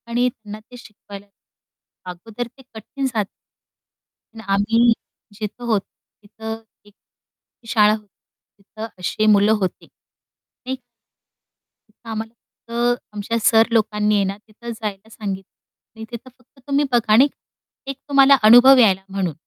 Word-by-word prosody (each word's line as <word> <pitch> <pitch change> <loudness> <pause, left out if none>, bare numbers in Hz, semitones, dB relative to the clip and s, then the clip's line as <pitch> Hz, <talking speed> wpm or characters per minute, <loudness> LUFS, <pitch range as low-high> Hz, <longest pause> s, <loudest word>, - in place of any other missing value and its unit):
आणि 240 +1 +1
त्यांना 215 -3 -11
ते 245 +3 -15
शिकवायला. 205 -4 -13 0.9
अगोदर 225 +7 -7
ते - - -15
कठीण 225 +5 -6
जातं. 235 -5 0 1.1
आणि 225 - -10
आम्ही 230 +4 +3 0.5
जिथे 215 +3 -6
होतो 215 -4 0 0.4
तिथं 220 +2 -7 0.2
एक 205 - -20 0.8
शाळा 210 -3 +4
होती 215 -1 -6 0.6
तिथं 215 +2 -8
अशी 185 +4 -1
मुलं 205 +1 +4
होती, 185 - -3
नाही 260 +1 -12
का? 260 - -22 1.1
तिथं 225 +2 -15
आम्हाला 225 0 -5 0.6
फक्त 245 - -8
आमच्या 210 +2 -2
सर 225 +1 +5
लोकांनी 210 -2 +1
आहे 200 - +3
ना, 195 +1 -3
तिथं 230 +2 -11
जायला 215 -2 -6
सांगितलं. 195 -4 -7 0.4
आणि 220 - -6
तिथं 240 +2 -8
फक्त 255 +2 -27
तुम्ही 285 +1 +2
बघा 235 -3 +1
आणि 255 +6 +7 0.6
एक 275 - -4
तुम्हाला 275 0 +6
अनुभव 245 +5 +8
यायला 195 -6 +4
म्हणून. 190 -4 -2
220 Hz, 135 wpm, -21 LUFS, 210-240 Hz, 1.1 s, अनुभव